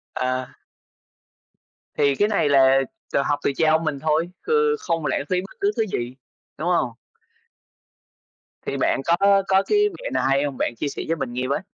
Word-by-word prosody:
À. 130 0 -2 1.5
Thì 140 -1 +3
cái 205 - +2
này 200 -8 +1
là 135 -1 +5 0.3
tự - - +3
học 145 0 0
từ - - +2
cha 160 -1 +3
ông 160 +1 +2
mình 150 -3 -2
thôi, 160 +3 0 0.2
ừ, 450 -1 +2
không 165 -4 -2
lãng 140 - 0
phí 180 0 +1
bất 195 - -12
cứ 400 +1 +2
thứ 225 - +3
gì, 120 +2 -3 0.4
đúng 160 +4 -3
hông? 135 -9 +1 1.7
Thì - - -3
bạn - - +1
có 195 +3 +4
có 190 0 +4
cái 420 - +1 0.2
mẹo - - -5
nào - - 0
hay 135 +1 +2
hông? 140 -3 -3
Bạn 120 - -1
chia 145 - -2
sẻ - - -5
với 165 - 0
mình 120 -5 -4
nghe 125 +1 -2
với. 140 +2 0
155 Hz, 195 wpm, -23 LUFS, 135-190 Hz, 1.7 s, là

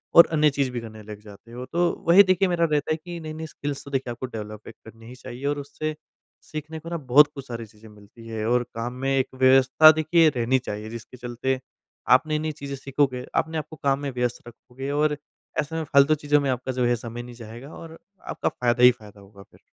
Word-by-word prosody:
और 170 - +10
अन्य 150 -1 +4
चीज़ 140 -1 -1
भी 120 - -3
करने 110 -1 -10
लग 105 0 -9
जाते 105 +2 -15
हो 125 +1 -7
तो 175 0 +3 0.2
वही 190 +4 +9
देखिए 185 0 +2
मेरा 170 -2 +2
रहता 150 +1 0
है 155 - +1
कि 175 -1 -7
नई-नई 160 0 -6
स्किल्स 145 -2 -6
तो 140 - -10
देखिए 135 -3 -2
आपको 120 +2 -5
डेवलप 110 -3 -8
करनी 115 0 -14
ही 125 - -10
चाहिए 130 +2 -9
और 145 0 0
उससे 150 +2 -5 0.6
सीखने 155 +1 -6
को 165 - -9
ना 170 - -2
बहुत 145 0 +6
कुछ 140 -1 -8
सारी 115 -2 -6
चीज़ें 110 +1 -18
मिलती 105 +2 -16
है 110 -1 -4
और 125 0 +3
काम 120 +2 -4
में 135 - +1
एक 130 - +1
व्यवस्था 130 +4 +7
देखिए 160 +1 +3
रहनी 130 -1 +1
चाहिए, 105 -3 -6
जिसके 115 +2 -10
चलते 125 +2 -2 0.5
आप 130 +5 +6
नई-नई 155 0 -1
चीज़ें 140 -2 -7
सीखोगे 135 -2 -1
अपने 160 0 0
आपको 155 +1 -6
काम 140 0 +2
में 140 - -3
व्यस्त 125 -1 -3
रखोगे 125 +3 -9
और 150 0 +1 0.4
ऐसे 160 +2 -2
फालतू 140 +1 +4
चीज़ों 145 0 +2
में 140 - -1
आपका 125 +1 -2
जो 125 -1 0
है 120 0 +3
समय 120 +1 -7
नहीं 120 -1 -11
जाएगा 120 +5 -10
और 165 0 -10 0.3
आपका - - -1
फ़ायदा 120 0 0
ही 125 - +10
फ़ायदा 105 -4 -14
होगा 100 0 -15
फिर। - - -23
130 Hz, 220 wpm, -24 LUFS, 120-150 Hz, 0.6 s, और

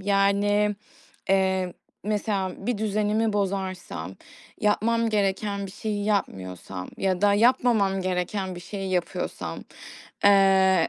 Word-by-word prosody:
yani, 205 +1 +2 0.5
eee, 190 -1 +2 0.3
mesela, 205 -2 -1
bir 240 -4 0
düzenimi 215 +1 +1
bozarsam, 185 - -3 0.5
yapmam 230 +2 +2
gereken 200 -1 0
bir - - -9
şeyi 205 +1 -3
yapmıyorsam 95 - -3
ya 185 -2 0
da 205 0 +5
yapmamam 225 -4 +3
gereken 185 +1 -2
bir 175 - -8
şeyi 195 +1 -5
yapıyorsam, 180 -2 -2 0.7
eee, 190 -3 +5
200 Hz, 105 wpm, -25 LUFS, 190-210 Hz, 0.7 s, da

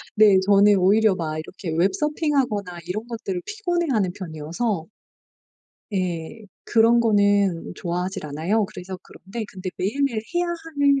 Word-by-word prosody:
네. 210 -3 +7
저는 205 0 +6
오히려 200 +2 +4
막 155 -2 -3
이렇게 175 +2 -7
웹 190 +3 +3
서핑하거나 270 - -1
이런 215 +6 -4
것들을 200 -6 -4
피곤해 350 -6 -1
하는 200 -6 +1
편이어서 165 +2 -3 1.1
예. 180 +2 -3 0.2
그런 230 +1 +4
거는 205 -5 +2
좋아하지를 180 -2 -3
않아요. 180 +9 +1
그래서 185 0 -8
그런데 215 +4 -8
근데 185 -1 -6
매일매일 230 +3 0
해야 350 0 +2
하는 300 -5 +1
205 Hz, 320 characters per minute, -23 LUFS, 180-235 Hz, 1.1 s, 네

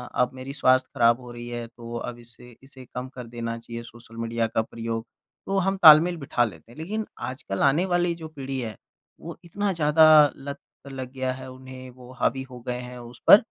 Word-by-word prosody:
अब 125 0 +2
मेरी 130 +1 -7
स्वास्थ्य 130 -2 +3
खराब 120 -1 +4
हो 125 -1 -10
रही 120 0 -8
है, 120 -1 -5
तो 115 0 -9
अब 120 0 -6
इसे 120 0 -13
इसे 135 -1 -13
कम 125 +1 -6
कर 125 -2 -7
देना 115 0 -4
चाहिए 115 0 -8
सोशल 115 -1 -14
मीडिया 115 0 -1
का 110 0 0
प्रयोग, 115 0 -5 0.4
तो 195 - -1
हम 195 0 +1
तालमेल 165 +2 +9
बिठा 140 -5 0
लेते 100 0 -10
हैं। 120 - -16
लेकिन 210 +7 -3 0.2
आजकल 125 -7 -5
आने 145 +6 +4
वाली 175 -1 +1
जो 165 -1 -8
पीढ़ी 135 -3 -5
है, 110 -4 -5 0.4
वो 170 0 -8
इतना 200 +4 -1
ज़्यादा 155 -1 +5 0.3
लत 140 +1 -7 0.3
लग 130 -2 -6
गया 130 -1 -1
है 130 0 -9
उन्हें, 130 0 -10
वो 125 0 -14
हावी 135 +2 +1
हो 125 - -9
गए 125 0 -2
हैं 125 0 -9
उस 120 0 -12
पर, - - +12
130 Hz, 210 wpm, -25 LUFS, 120-145 Hz, 0.4 s, पर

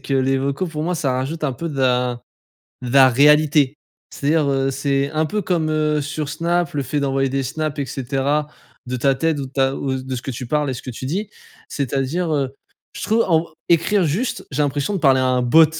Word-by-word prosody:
que 140 - -5
les 135 0 +2
vocaux, 140 +6 -1
pour 155 -3 -4
moi, 180 +3 -1
ça 140 -5 0
rajoute 140 +5 -3
un 140 - 0
peu 165 +6 -4
de 140 -3 -6
la 125 -1 +1 0.6
de 125 - -4
la 135 -1 +7
réalité. 150 +1 +4 0.4
C'est-à-dire, 150 0 +1
heu, 135 0 +1
c'est 140 0 0
un 155 0 +1
peu 210 +4 -2
comme, 165 -3 0
heu, 150 -1 +1
sur 145 +1 -4
Snap, 170 +1 -1
le 145 - 0
fait 145 +3 -2
d'envoyer 135 -1 +1
des 135 0 -1
snaps 155 +3 -3
et 140 - -1
cetera, 140 +3 -1 0.4
de 125 +1 -3
ta 135 +2 +2
tête 160 +3 0
ou 140 - -3
de 130 - -14
ta 135 -1 +1
ou 135 -1 -2
de 130 0 -4
ce 120 - -6
que 135 - -4
tu 125 +1 -6
parles 150 0 +1
et - - -3
ce - - -8
que 130 - -6
tu 130 +2 -6
dis. 200 +8 -3 0.4
C'est-à-dire, 140 +5 -1
heu, 135 -2 -1 0.4
je - - -8
trouve 225 +2 +2
en 165 -1 +3 0.2
écrire 170 +3 +3
juste, 190 - -1
j'ai 150 +1 0
l'impression 145 +6 -1
de 195 - 0
parler 135 -4 +4
à 130 - +2
un 125 -1 +2
bot. 160 +7 +6
140 Hz, 230 wpm, -20 LUFS, 135-155 Hz, 0.6 s, la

